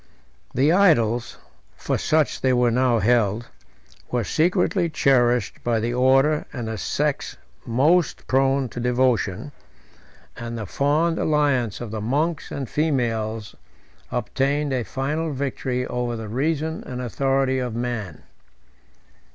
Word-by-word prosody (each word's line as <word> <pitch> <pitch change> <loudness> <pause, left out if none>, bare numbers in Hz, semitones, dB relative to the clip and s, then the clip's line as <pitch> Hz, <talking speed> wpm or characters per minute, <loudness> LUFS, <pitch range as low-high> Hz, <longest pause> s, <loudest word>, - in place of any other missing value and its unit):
The 140 +5 +4
idols 120 - +3 0.4
(for - - -1
such 155 -1 +1
they 130 -1 +2
were 120 -1 +3
now 125 0 +2
held) 115 0 +1 0.6
were 125 -2 0
secretly 170 - +1
cherished 125 -7 +2
by 120 -2 +1
the 115 +2 -1
order 135 +4 +3
and 120 -4 -5
the 110 -1 -4
sex - - -2 0.3
most 145 +8 +2
prone 135 0 +2
to 120 - -7
devotion; 125 -2 0 0.8
and 120 0 -6
the 110 - -4
fond 150 - +1
alliance 140 -8 +1
of 120 -3 -6
the 110 -1 -4
monks 150 +8 -1
and 135 -2 -4
females 115 -7 -1 0.6
obtained 140 +1 -1
a 130 - 0
final 150 - -2
victory 130 -2 -2
over 125 -1 -2
the 110 -2 -6
reason 155 +6 -1
and 125 -1 -6
authority 135 +2 0
of 125 -3 -3
man. 120 -8 -4
125 Hz, 125 wpm, -23 LUFS, 120-145 Hz, 0.8 s, The